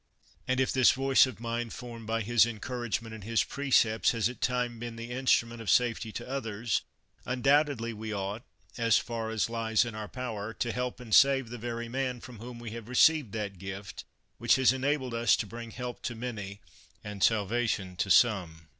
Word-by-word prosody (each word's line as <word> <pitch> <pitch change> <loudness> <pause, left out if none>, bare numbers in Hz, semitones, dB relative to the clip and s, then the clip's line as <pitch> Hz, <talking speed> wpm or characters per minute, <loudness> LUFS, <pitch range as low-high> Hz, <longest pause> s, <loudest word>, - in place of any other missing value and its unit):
And 130 0 +1
if 130 - +2
this 130 -1 +5
voice 135 0 +4
of 130 -5 -8
mine, 115 0 -3
formed 115 -2 -9
by 115 0 0
his 115 +1 +4
encouragement 120 0 -3
and 110 -3 -9
his 115 +2 +1
pre 140 0 -5
cepts, 110 -3 +4
has 115 -2 +1
at 125 - -10
times 125 -2 -1
been 120 0 -6
the 115 +1 -7
instrument 120 -2 +1
of 110 - -4
safety 115 -2 +2
to - - -6
others, 115 -5 -2 0.4
undoubtedly 130 -2 +1
we 110 0 -6
ought, 100 +2 -3 0.4
as 115 -1 +4
far 115 -2 -3
as 110 -1 0
lies 115 -1 +1
in 115 - -5
our 110 -1 -6
power, 110 -4 -5
to 120 -3 -1
help 125 +1 -3
and 115 -3 -7
save 135 -2 +5
the 120 - -6
very 120 0 -4
man 125 0 -2
from 120 -2 -11
whom 120 +1 -8
we 120 -2 -7
have 115 0 -8
received 145 -1 +4
that 100 -4 -4
gift 95 +1 -7 0.4
which - - +4
has 130 -1 +4
enabled 130 -1 -1
us 115 -2 +4
to - - -3
bring 115 +3 -8
help 125 +1 -6
to 120 - -4
many 105 -4 -6 0.4
and 105 -1 -7
salva 115 +3 +2
tion 95 -4 -2
to 95 - -1
some. 90 -8 +3
115 Hz, 200 wpm, -29 LUFS, 110-125 Hz, 0.4 s, this